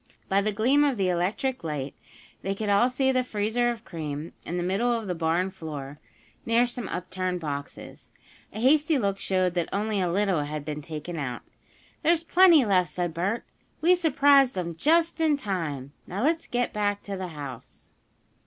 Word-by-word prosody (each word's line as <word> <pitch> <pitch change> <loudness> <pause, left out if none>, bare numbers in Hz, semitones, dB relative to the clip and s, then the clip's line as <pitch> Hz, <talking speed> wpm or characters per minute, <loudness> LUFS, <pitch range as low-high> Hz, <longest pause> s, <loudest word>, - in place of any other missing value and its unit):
By 195 +1 +2
the 215 +1 0
gleam 250 +8 +3
of 280 -4 +1
the 190 -2 +1
electric 190 +9 -1
light 145 -4 -4 0.5
they 195 +1 -2
could 210 +1 -3
all 205 +5 +4
see 265 +1 +1
the 255 -1 +2
freezer 225 +1 0
of 230 -1 -5
cream 155 -1 -5
in 175 - -2
the 175 - -1
middle 195 +7 +1
of 230 -2 -1
the 185 - -2
barn 170 +3 0
floor, 150 -5 -7 0.4
near 230 +1 +3
some 240 -3 -5
upturned 185 0 -3
boxes. 145 -3 -7 0.4
A 215 - -7
hasty 295 +5 +4
look 200 -5 -1
showed 185 -2 +1
that 175 -2 -1
only 210 0 0
a 180 -2 0
little 195 -3 +1
had 150 0 -5
been 150 0 -4
taken 160 +3 -6
out. 130 -5 -4 0.6
"There's 335 0 +3
plenty 335 -5 +6
left!" 185 -5 +2
said 175 +1 -3
Bert. 195 +8 -1 0.4
"We 340 +4 +5
surprised 285 - +4
'em 170 -2 -3
just 330 - +2
in 310 -3 +3
time. 165 - -3 0.2
Now 195 +6 -3
let's 325 +3 +1
get 245 0 -1
beck 205 -1 -1
to 200 - -5
the 185 -1 -4
house." 140 -3 -9
195 Hz, 180 wpm, -26 LUFS, 170-245 Hz, 0.6 s, plenty